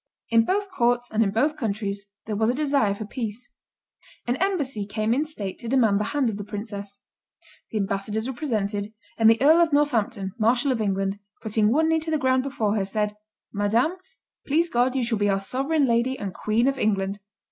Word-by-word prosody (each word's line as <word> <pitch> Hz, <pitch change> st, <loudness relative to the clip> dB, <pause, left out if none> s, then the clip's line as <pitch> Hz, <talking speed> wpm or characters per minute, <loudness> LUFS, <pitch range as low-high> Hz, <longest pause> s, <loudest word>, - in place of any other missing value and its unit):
In 230 Hz, 0 st, +5 dB
both 400 Hz, -, -1 dB
courts 245 Hz, -5 st, +1 dB
and 220 Hz, -, +1 dB
in 210 Hz, -, +3 dB
both 285 Hz, +10 st, +1 dB
countries 200 Hz, -4 st, -3 dB, 0.2 s
there 215 Hz, -, -3 dB
was 220 Hz, +2 st, +2 dB
a 245 Hz, -, +1 dB
desire 275 Hz, -8 st, +1 dB
for 215 Hz, -, -6 dB
peace. 225 Hz, +1 st, -5 dB, 0.7 s
An 245 Hz, -, 0 dB
embassy 285 Hz, -, -1 dB
came 215 Hz, +2 st, 0 dB
in 285 Hz, +5 st, +1 dB
state 210 Hz, -12 st, -6 dB
to 235 Hz, -, -8 dB
demand 225 Hz, -5 st, +3 dB
the 210 Hz, -, -1 dB
hand 285 Hz, 0 st, 0 dB
of 200 Hz, -, -6 dB
the 205 Hz, -, -5 dB
princess. 205 Hz, -1 st, -7 dB, 0.7 s
The 220 Hz, -, -3 dB
ambassadors 205 Hz, +3 st, -2 dB
were 265 Hz, -, -3 dB
presented, 215 Hz, -6 st, -2 dB, 0.3 s
and 225 Hz, 0 st, +7 dB
the 225 Hz, 0 st, +4 dB
Earl 315 Hz, +5 st, +6 dB
of 335 Hz, -2 st, +3 dB
Northampton, 240 Hz, -9 st, +1 dB
marshal 245 Hz, +5 st, +2 dB
of 235 Hz, -3 st, -1 dB
England, 195 Hz, -1 st, -1 dB, 0.2 s
putting 215 Hz, 0 st, +2 dB
one 315 Hz, +5 st, +3 dB
knee 320 Hz, 0 st, +3 dB
to 320 Hz, +1 st, -6 dB
the 315 Hz, -, +2 dB
ground 260 Hz, -2 st, +2 dB
before 235 Hz, -6 st, -1 dB
her, 200 Hz, -, +1 dB
said, 210 Hz, +1 st, -2 dB, 0.4 s
"Madame, 220 Hz, -, +1 dB, 0.5 s
please 330 Hz, +4 st, +2 dB
God 250 Hz, 0 st, +1 dB
you 260 Hz, -, +1 dB
shall 230 Hz, -2 st, -1 dB
be 205 Hz, 0 st, +2 dB
our 195 Hz, 0 st, +2 dB
sovereign 275 Hz, +9 st, +1 dB
lady 240 Hz, +2 st, +1 dB
and 195 Hz, -3 st, -5 dB
Queen 225 Hz, +4 st, +1 dB
of 270 Hz, -1 st, 0 dB
England." 200 Hz, -1 st, 0 dB
225 Hz, 200 wpm, -25 LUFS, 205-270 Hz, 0.7 s, and